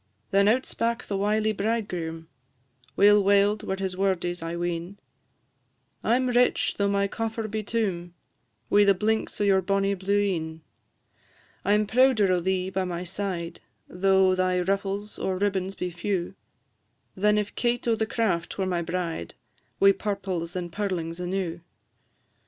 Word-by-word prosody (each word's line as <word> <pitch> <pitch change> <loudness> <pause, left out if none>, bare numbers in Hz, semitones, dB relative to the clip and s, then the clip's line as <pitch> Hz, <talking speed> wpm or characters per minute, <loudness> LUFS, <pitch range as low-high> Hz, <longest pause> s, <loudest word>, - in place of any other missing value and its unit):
Then 200 +1 +4
out 250 +5 +3
spak 235 +1 -2
the 200 - -3
wily 210 +2 +1
bridegroom, 195 -7 -3 0.7
Weel 205 0 +6
waled 200 +1 +3
were 190 - -2
his 190 -1 -3
wordies, 180 -2 -1
I 165 +1 -4
ween, 175 +2 -3 1.1
"I 230 - +3
'm 255 0 +1
rich, 245 0 +2
though 200 - +2
my 200 0 +1
coffer 225 +1 -3
be 215 +1 -3
toom, 190 -6 -2 0.6
Wi' 205 0 +6
the 200 -1 +5
blinks 220 +3 -1
o' - - +1
your 195 -2 +4
bonnie 195 +1 +1
blue 200 +1 0
een; 160 -5 -2 1.0
I 200 - +2
'm 210 0 +2
prouder 225 -3 +4
o' 180 - +3
thee 185 +1 -1
by 190 0 -1
my 175 -1 -4
side, 180 -2 -4 0.3
Though 190 +1 +3
thy 185 -1 +1
ruffles 195 +2 -2
or 190 -1 -1
ribbons 195 -1 -1
be 180 - -3
few, 175 +1 -2 0.8
Than 210 +2 +3
if 210 -1 -2
Kate 240 0 -1
o' 230 - +4
the 220 0 -1
Craft 205 -8 -1
were 190 - 0
my 180 -2 -1
bride, 170 - -4 0.4
Wi' 195 - +7
purples 190 -4 -3
and 175 -2 -4
pearlings 175 -4 -3
enew. 180 -1 -3
195 Hz, 155 wpm, -26 LUFS, 180-210 Hz, 1.1 s, Wi